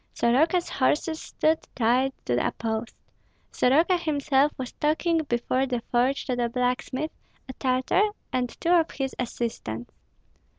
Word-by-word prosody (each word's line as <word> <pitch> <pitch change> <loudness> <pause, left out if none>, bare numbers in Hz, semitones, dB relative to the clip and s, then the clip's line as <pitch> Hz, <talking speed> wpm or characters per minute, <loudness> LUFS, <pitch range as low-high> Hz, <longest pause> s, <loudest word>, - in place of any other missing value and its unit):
Soroka's 315 +9 +2
horses 310 +4 0
stood 315 +1 +1 0.2
tied 250 +3 +2
to 120 - 0
a - - +1
post. 225 +1 -3 0.6
Soroka 320 +8 +3
himself 290 -3 +2
was 255 -2 -5
talking 320 +2 +1
before 255 +1 0
the 245 -2 -2
forge 255 +3 +2
to 255 - -1
the 240 -1 0
blacksmith, 250 +5 -1 0.4
a 260 - -7
Tartar, 260 - +1 0.2
and 250 -1 0
two 335 - +1
of 335 -2 +4
his 270 -1 -3
assistants. 225 - -4
260 Hz, 135 wpm, -26 LUFS, 245-310 Hz, 0.6 s, of